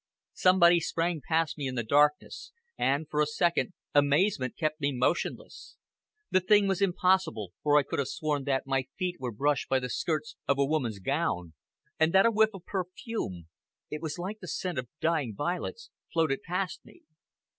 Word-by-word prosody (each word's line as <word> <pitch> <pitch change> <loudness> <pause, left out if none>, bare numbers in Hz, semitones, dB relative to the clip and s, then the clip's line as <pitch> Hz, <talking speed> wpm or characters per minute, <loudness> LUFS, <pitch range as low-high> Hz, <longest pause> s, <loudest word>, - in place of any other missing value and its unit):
Somebody 175 -2 +5
sprang 165 0 -1
past 160 -1 0
me 140 - -2
in 130 - -4
the 120 - -1
darkness, 145 +5 +1 0.2
and, 145 +3 0
for 150 0 0
a 150 - +2
second, 170 +4 0 0.2
amazement 145 - +2
kept 155 -1 -1
me 140 0 +1
motionless. 130 +6 -2 0.5
The 185 - +5
thing 205 +2 +4
was 195 0 0
impossible, 180 - +1
or 150 0 +4
I 145 - +5
could - - -4
have 140 - 0
sworn 150 -3 -2
that 135 -1 0
my 135 -1 0
feet 180 -2 -2
were 125 -2 -3
brushed 140 +5 0
by 135 - +3
the 125 -1 -3
skirts 155 +1 -2
of 140 - +2
a 140 - +3
woman's 135 -8 -1
gown, 95 - -2 0.5
and 160 +1 +3
that 195 +2 +6
a 230 - +5
whiff 220 0 +4
of 180 -2 -11
perfume 185 - -4 0.4
it 150 - -4
was 160 0 -4
like 195 +5 -5
the 185 - -9
scent 175 -2 -3
of 125 -2 -6
dying 155 -9 0
violets 180 - -3 0.2
floated 160 -5 +1
past 180 +1 -3
me. - - -18
155 Hz, 180 wpm, -29 LUFS, 135-180 Hz, 0.5 s, that